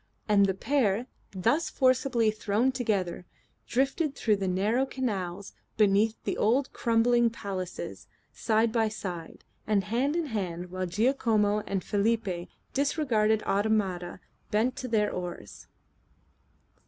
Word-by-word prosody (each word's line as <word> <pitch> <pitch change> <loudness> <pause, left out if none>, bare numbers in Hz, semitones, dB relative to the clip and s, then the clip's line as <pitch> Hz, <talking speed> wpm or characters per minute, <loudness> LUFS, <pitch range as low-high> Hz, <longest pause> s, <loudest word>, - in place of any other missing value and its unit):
And 200 -2 +5
the 190 - 0
pair, 230 -2 +1 0.2
thus 230 - +1
forcibly 255 -3 +2
thrown 215 +4 +1
together, 200 -9 -2 0.4
drifted 275 +4 0
through 215 -3 +1
the 195 -1 -2
narrow 205 +8 +1
canals 200 -8 -3 0.2
beneath 215 +1 +3
the - - -2
old 255 +6 +2
crumbling 235 0 +3
palaces, 185 - -6 0.3
side 225 0 +1
by 225 -1 +2
side, 180 -6 -7 0.2
and 205 -2 +2
hand 245 - 0
in 340 -1 0
hand 180 - -4
while 185 0 -3
Giacomo 210 0 +2
and 195 -2 -2
Felipe, 205 -4 -1 0.2
disregarded 240 -7 +1
automata, 195 -4 0 0.3
bent 225 +4 +1
to 255 - -4
their 215 -3 +1
oars. 175 - -7
215 Hz, 120 wpm, -28 LUFS, 190-240 Hz, 0.4 s, And